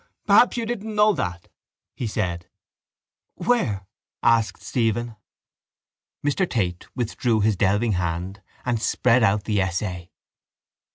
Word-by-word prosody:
—Perhaps 215 +4 +5
you 235 - -1
didn't 220 -2 -4
know 210 0 +5
that, 90 - -4 0.5
he 125 - -3
said. 85 -5 -3 0.9
—Where? 115 - 0 0.4
asked 115 -3 +2
Stephen. 115 -1 -1 1.1
Mr 170 +6 +1
Tate 90 -7 -2
withdrew 115 -2 0
his 105 0 +2
delving 105 +4 +2
hand 90 +1 -2 0.2
and 120 -3 0
spread 125 +1 +3
out 105 -1 +3
the 105 -2 +1
essay. 90 -1 -3
110 Hz, 115 wpm, -24 LUFS, 95-125 Hz, 1.1 s, Perhaps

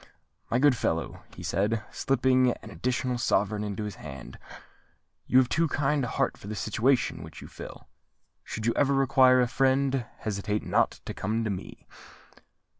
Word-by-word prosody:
"My 120 - +2
good 140 0 +5
fellow," 80 -7 -2
he - - -9
said, 105 +3 0
slipping 130 -1 +2
an - - -10
additional 125 0 -1
sovereign 105 -2 +1
into 105 0 -4
his 105 -3 -6
hand, 65 -4 -9 0.9
"you 130 - +4
have 130 -1 +6
too 165 +6 +1
kind 145 -1 0
a - - -1
heart - - -1
for - - -10
the 110 - -4
situation 115 -1 +1
which 80 0 -10
you - - -10
fill. - - -10 0.6
Should 110 - -5
you 115 - +2
ever 140 -1 +3
require 130 -1 +5
a 125 - +2
friend, 135 -1 +1
hesitate 105 0 -2
not - - +1
to - - -5
come 110 +3 -1
to 110 - -1
me." 95 - -7
120 Hz, 170 wpm, -28 LUFS, 105-130 Hz, 0.9 s, have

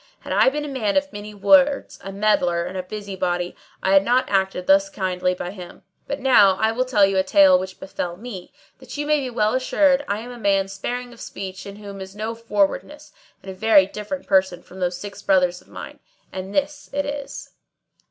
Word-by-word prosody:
Had - - -5
I - - +5
been 295 +2 -4
a 275 -3 -5
man 210 0 +1
of 285 -2 0
many 205 0 -8
words, 280 +6 +3
a 195 - -6
meddler, 185 -4 +1
a 185 0 -4
busy 200 +1 -7
body, 175 -1 -2 0.3
I 190 - +2
had 195 0 +6
not 245 +4 +2
acted 190 -2 0
thus 195 +1 +4
kindly 185 -2 -1
by 180 0 -5
him; 180 -3 -11 0.2
but 280 - -3
now 210 -8 +5
I 220 +2 +2
will 250 +3 -1
tell 215 -6 +4
you 195 0 0
a 190 - +3
tale 190 -2 +5
which 185 0 -7
befell 175 -2 -5
me, 205 -4 -9 0.3
that 260 +1 -10
you 295 - -2
may 300 0 +2
be 265 -2 -3
well 215 -3 +1
assured 270 +2 +2
I 200 - -1
am 245 +2 -9
a 245 - -10
man 195 -2 +2
sparing 245 +5 -5
of 235 - -14
speech 190 -1 -7
in 200 - -8
whom 200 -1 -9
is 190 +1 -9
no 215 +2 -3
forwardness 230 - -2 0.3
and 195 - -7
a - - -7
very 200 0 +5
different 210 +8 -6
person 190 -2 +1
from 190 - -13
those 180 -1 -1
six 205 -1 -9
Brothers 180 -2 +2
of - - -24
mine; - - -10 0.3
and 190 +1 -6
this 290 +4 -2
it 285 0 -1
is." 285 -1 -6
200 Hz, 215 wpm, -22 LUFS, 190-250 Hz, 0.3 s, had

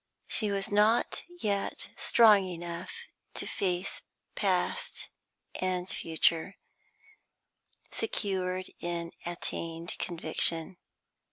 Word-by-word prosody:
She 215 - +1
was 200 0 -1
not 210 +3 +4 0.2
yet 200 -2 -1
strong 210 -5 +6
enough 170 -1 -5 0.4
to - - -1
face 185 -1 -1 0.3
past - - 0 0.4
and 185 -1 -1
future, 165 +1 +1 1.4
secured 185 - -1
in 170 -1 -3 0.2
attained 170 -1 -4
conviction. 165 +1 +2
185 Hz, 80 wpm, -31 LUFS, 170-200 Hz, 1.4 s, strong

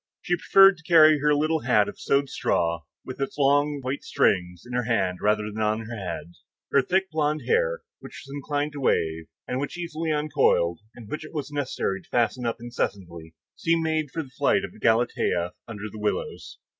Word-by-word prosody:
She 175 - +1
preferred 195 +2 +6
to 165 - -18
carry 155 -2 +7
her 150 +1 +3
little 155 +2 +1
hat 110 -6 +3
of - - -8
sewed 140 0 +1
straw, 85 -8 0 0.2
with 130 +1 -7
its 135 - -3
long 145 +1 +2
white 130 +3 -3
strings, 90 -2 +1
in 125 - -9
her 125 -1 0
hand 95 -6 0
rather 105 0 +1
than 110 +1 -5
on 110 +1 +1
her 115 +1 -7
head. 90 -4 -6 0.4
Her 140 - +5
thick 190 +6 0
blond 155 -1 0
hair, - - +1 0.2
which - - -11
was 135 - -10
inclined 145 +1 -2
to 145 - -7
wave, 80 -10 0 0.2
and 125 - -2
which 145 +5 -4
easily 165 -2 -3
uncoiled, 145 - +2 0.2
and 115 -3 -11
which 155 +7 -5
it 155 - -11
was 145 -1 -4
necessary 130 -9 -2
to - - -26
fasten 120 +1 0
up 115 - -2
incessantly, 85 -9 -5 0.2
seemed 165 0 +1
made 160 -2 0
for 160 +4 -4
the 135 - -14
flight 145 +8 +1
of 215 +2 -13
Galatea 110 -6 +1
under 105 -3 -8
the 110 +1 -10
willows. 105 0 -3
135 Hz, 195 wpm, -25 LUFS, 105-155 Hz, 0.4 s, carry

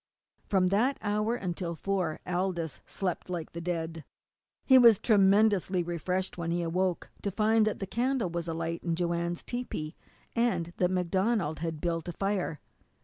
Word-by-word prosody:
From 185 -2 +3
that 235 +8 +2
hour 210 +2 +1
until 175 -4 -3
four 185 -3 -2
Aldous 175 -3 -2
slept 185 -2 -3
like 175 -3 -4
the 170 - -6
dead. 165 -2 -3 0.6
He 260 -1 +8
was 230 -4 +8
tremendously 200 -3 +3
refreshed 180 +2 -2
when 170 -1 -2
he 170 +1 0
arose, 180 +2 +1 0.3
to 200 - -1
find 215 +2 +3
that 215 - -1
the 195 - -4
candle 240 -2 0
was 170 0 -3
alight 165 0 -3
in 170 -1 0
Joanne's 170 0 -1
tepee, 210 -10 -4 0.4
and 180 -8 0
that 180 - +2
MacDonald 185 -1 0
had 165 -1 -3
built 165 -1 -1
a - - -4
fire. 195 -6 -1
180 Hz, 155 wpm, -29 LUFS, 170-205 Hz, 0.6 s, He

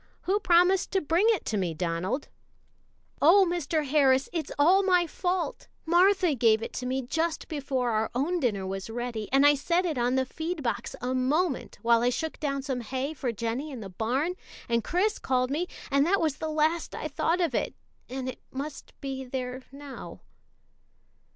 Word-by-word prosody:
"Who 390 +3 +1
promised 360 0 +4
to 385 - +4
bring 335 +7 +2
it 440 -5 +1
to 215 - -1
me, 175 -4 -1
Donald?" 175 - -2 0.9
"Oh, 375 +6 +7
Mr. 325 -3 -1
Harris, 270 -2 +3
it's 330 -3 -3
all 350 +7 +5
my 365 -3 +3
fault! 360 +2 -2 0.2
Martha 360 0 +4
gave 225 -3 +3
it - - -6
to 250 - -4
me 260 +1 -1
just 320 +6 -2
before 270 -5 -1
our 220 0 0
own 330 +8 0
dinner 210 - 0
was 195 +2 -5
ready, 235 -2 -4
and 275 +2 +5
I 290 - +8
set 340 +6 +1
it 310 -7 -1
on 245 +2 +1
the 260 0 +2
feed 320 +3 -4
box 235 - -2
a 250 +1 -1
moment, 275 +4 0
while 230 0 +4
I 245 - +3
shook 320 +6 -3
down 275 -3 -2
some 265 -3 -2
hay 260 +5 -3
for 260 -5 -2
Jennie 230 +6 -3
in 260 -5 -7
the 195 - -7
barn, 250 - -1 0.3
and 235 -1 +1
Chris 380 - 0
called 255 0 0
me, 335 +5 -1 0.2
and 280 0 +4
that 395 +2 +3
was 310 -4 0
the 315 - -3
last 310 +2 0
I - - -3
thought 325 +4 0
of 335 -7 +1
it, - - -1 0.3
and 260 0 -4
it 255 - -6
must 280 +2 -7
be 270 -1 -4
there 255 0 -4
now." 280 -1 -9
275 Hz, 190 wpm, -28 LUFS, 250-335 Hz, 0.9 s, I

